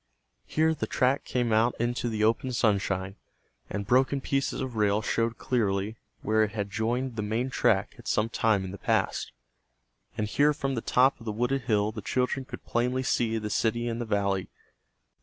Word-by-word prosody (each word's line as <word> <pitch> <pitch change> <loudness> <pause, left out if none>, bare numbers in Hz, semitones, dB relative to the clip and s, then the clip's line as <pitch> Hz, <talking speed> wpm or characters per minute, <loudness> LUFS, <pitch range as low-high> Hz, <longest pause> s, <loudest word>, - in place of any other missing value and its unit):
Here 160 +1 +2
the 155 - -3
track 130 +2 +1
came 120 -3 0
out 115 +3 +3
into 120 +1 -1
the 110 -1 -1
open 115 +4 +1
sunshine, 100 -4 0 0.5
and 100 0 -3
broken 130 +5 +3
pieces 135 0 -1
of 130 -3 -4
rail 105 0 +2
showed 115 +1 0
clearly 105 -3 0 0.3
where 110 +1 +2
it 105 -1 -2
had 100 -2 -3
joined 120 +4 -1
the - - 0
main 115 +5 -1
track - - +2
at - - -12
some 110 +1 +2
time 110 -4 +1
in 95 - -6
the 100 - -8
past. - - 0 0.9
And 105 -1 0
here 145 +7 +3
from 135 -2 -2
the 115 - -2
top 130 +4 +3
of 115 - -13
the - - 0
wooded 125 +5 0
hill 105 -3 +2
the 110 - -7
children 130 +5 -1
could - - -9
plainly 125 +2 0
see 115 -3 +1
the 105 -1 -4
city 120 +2 0
in 115 0 -2
the 120 - -2
valley. 100 -3 0
115 Hz, 190 wpm, -28 LUFS, 105-125 Hz, 0.9 s, out